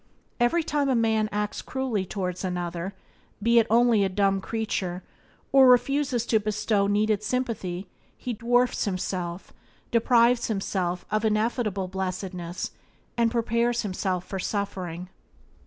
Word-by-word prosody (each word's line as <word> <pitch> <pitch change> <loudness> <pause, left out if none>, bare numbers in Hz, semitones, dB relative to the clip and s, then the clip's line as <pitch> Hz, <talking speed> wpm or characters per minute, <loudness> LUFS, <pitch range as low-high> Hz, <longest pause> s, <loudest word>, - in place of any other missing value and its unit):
Every 280 +8 +3
time 290 -2 0
a 260 - +3
man 220 -2 +2
acts 210 0 -2
cruelly 250 -8 -2
towards 185 -2 -3
another 180 0 -3 0.4
(be 235 +3 +4
it 225 - +2
only 230 -2 +4
a 195 - +1
dumb 195 0 +1
creature), 190 -5 -3 0.5
or 270 -1 +7
refuses 250 -1 +3
to 220 - +3
bestow 210 -1 0
needed 210 0 +2
sympathy, 210 -7 -2 0.3
he 250 - -4
dwarfs 245 +3 +1
himself, 185 -2 -3 0.4
deprives 235 +1 +4
himself 190 -4 -2
of 215 0 +1
ineffable 215 -2 0
blessedness, 185 -2 -4 0.4
and 235 -1 +3
prepares 235 +1 +1
himself 185 -2 -2
for 190 - -5
suffering. 185 -3 -3
210 Hz, 125 wpm, -26 LUFS, 185-235 Hz, 0.5 s, or